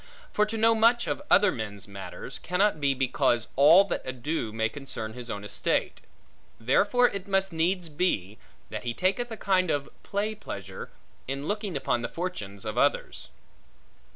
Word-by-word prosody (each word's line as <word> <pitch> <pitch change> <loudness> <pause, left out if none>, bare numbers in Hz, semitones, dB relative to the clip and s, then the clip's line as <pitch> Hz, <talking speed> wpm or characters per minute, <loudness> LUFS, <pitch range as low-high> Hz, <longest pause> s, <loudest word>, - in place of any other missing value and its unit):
For 210 0 +3
to 225 +1 -3
know 225 +1 +5
much 230 +2 +4
of - - -2
other 200 0 +6
men's 105 -3 -6
matters, 95 -3 -7
cannot 180 -2 +1
be 140 -1 +2
because 130 -2 +1
all 155 +8 +8
that 200 - -3
ado 130 -1 -3
may 110 0 0
concern 110 -3 -6
his 120 0 -8
own 100 -2 -4
estate; 105 - -1 0.6
therefore 205 - +3
it 200 -1 -5
must 195 -2 +1
needs 175 +2 0
be, 145 - -1 0.3
that - - -5
he 120 -1 -3
taketh 195 +6 0
a 225 - -6
kind 185 -4 +2
of 145 -2 -1
play 205 +2 -2
pleasure, 100 - -8 0.4
in 135 +3 -4
looking 205 -6 -2
upon 120 -3 0
the 120 - -3
fortunes 105 - -5
of - - -2
others. - - 0
155 Hz, 165 wpm, -27 LUFS, -, 0.6 s, all